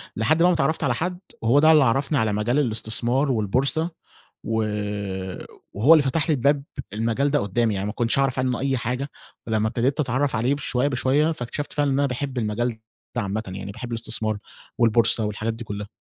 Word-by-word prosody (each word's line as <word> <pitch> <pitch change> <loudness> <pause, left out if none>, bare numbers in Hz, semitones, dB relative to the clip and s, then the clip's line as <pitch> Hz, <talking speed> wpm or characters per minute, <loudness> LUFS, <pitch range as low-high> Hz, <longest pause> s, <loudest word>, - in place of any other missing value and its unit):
لحد 150 +9 +2
بقى 170 - +5
ما 180 - +4
اتعرّفت 160 0 0
على 125 - +2
حد 175 +6 -3 0.2
وهو 120 +6 +4
ده 155 +1 +6
اللي 150 -3 +6
عرّفني 135 +4 +1
على 110 -3 +1
مجال 120 +7 +1
الاستثمار 120 +3 +1
والبورصة 130 - +1 0.5
و 115 - -2 1.2
وهو 120 +11 +5
اللي 155 - +5
فتح 140 +3 0
لي - - +4
الباب 140 +2 +2 0.3
المجال 115 +6 0
ده 145 - +3
قدّامي، 110 0 0
يعني 95 +1 -2
ما 105 - -2
كنتش 120 +3 0
أعرف 135 -1 +1
عنه 130 -1 0
أي 135 -1 0
حاجة، 125 +4 -3 0.4
ولمّا 110 -1 +1
ابتديت 130 +6 0
أتعرّف 135 -1 0
عليه 125 +5 +1
شوية 130 0 0
بشوية 140 +4 +2
فاكتشفت 145 +1 -5
فعلًا 145 -1 +1
إن 135 - +1
أنا 140 - +3
باحب 130 +1 -3
المجال 115 +1 -1 0.4
ده - - +2
عامةً 100 +2 -2
يعني، 95 +1 -6
باحب 120 +3 -7
الإستثمار 110 -2 -1 0.4
والبورصة 115 -1 +3
والحاجات 110 +2 -2
دي 115 +1 -8
كلّها. 105 -1 -5
125 Hz, 190 wpm, -24 LUFS, 110-140 Hz, 1.2 s, ده